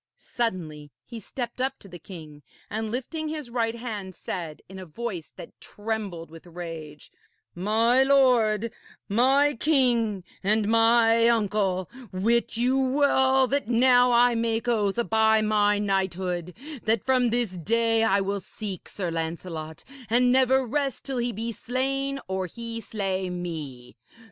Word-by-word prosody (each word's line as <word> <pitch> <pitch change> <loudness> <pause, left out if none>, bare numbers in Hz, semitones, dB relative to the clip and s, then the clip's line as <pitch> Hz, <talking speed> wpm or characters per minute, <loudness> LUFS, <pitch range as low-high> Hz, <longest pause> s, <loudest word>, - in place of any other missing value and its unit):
Suddenly 165 -11 -4 0.2
he 235 -2 -8
stepped 240 +3 -6
up 265 +1 -1
to - - -14
the 175 -2 -10
king, 155 -4 -11 0.3
and 220 +1 -3
lifting 290 +7 -4
his 305 -5 -5
right 230 -1 -1
hand 210 -6 -6
said, 165 -4 -6
in 190 0 -10
a 185 - -8
voice 180 -1 -6
that - - -12
trembled 205 -7 -5
With 165 +2 -13
rage: 165 -4 -9 0.4
'My 225 +7 +2
lord, 240 -5 +3 0.4
my 270 +7 +3
king, 235 - +1 0.2
and 210 +1 +2
mine 230 0 +4
uncle, 205 -5 +1 0.2
wit 230 +5 0
you 255 +3 +2
well 265 -1 +3
that 275 -1 0
now 245 +1 +5
I 240 0 +5
make 230 0 -1
oath 210 -4 +1
by 220 0 +4
my 210 -1 +2
knighthood, 185 -3 -2 0.3
that 220 -1 +1
from 255 -2 +3
this 235 -3 0
day 225 +5 +1
I 200 -2 +3
will 200 +1 -2
seek 195 0 -8
Sir 180 -4 -4
Lancelot 165 -1 -5 0.3
and 245 +2 +4
never 260 0 +3
rest 275 +1 -2
till 265 -3 -2
he 240 0 0
be 230 +2 -4
slain 270 +4 -2
or 190 0 -2
he 230 +4 -6
slay 195 -3 -2
me. 155 -9 -6
225 Hz, 145 wpm, -26 LUFS, 185-245 Hz, 0.4 s, now